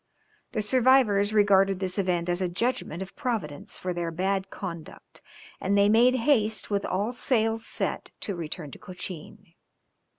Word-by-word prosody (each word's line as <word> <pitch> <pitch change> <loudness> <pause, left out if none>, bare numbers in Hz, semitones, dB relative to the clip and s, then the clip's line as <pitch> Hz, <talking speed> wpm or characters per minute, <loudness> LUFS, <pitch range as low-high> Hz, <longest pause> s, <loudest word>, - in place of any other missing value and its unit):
The 215 -3 0
survivors 230 -4 +4
regarded 195 -2 +4
this 185 0 -2
event 180 -3 0
as 175 +1 0
a 185 - 0
judgment 190 -3 -2
of 190 - -13
Providence 205 - -4
for 180 0 -3
their 170 -1 -2
bad 190 +3 -1
conduct, 170 -5 -9 0.4
and 200 +2 +1
they 200 0 +5
made 240 +4 +5
haste, 220 -6 +1
with 200 0 0
all 205 +5 -1
sails 225 -2 0
set - - -3
to 200 - -2
return 165 -3 -5
to - - -11
Cochin. 185 -1 -9
200 Hz, 155 wpm, -27 LUFS, 180-220 Hz, 0.4 s, they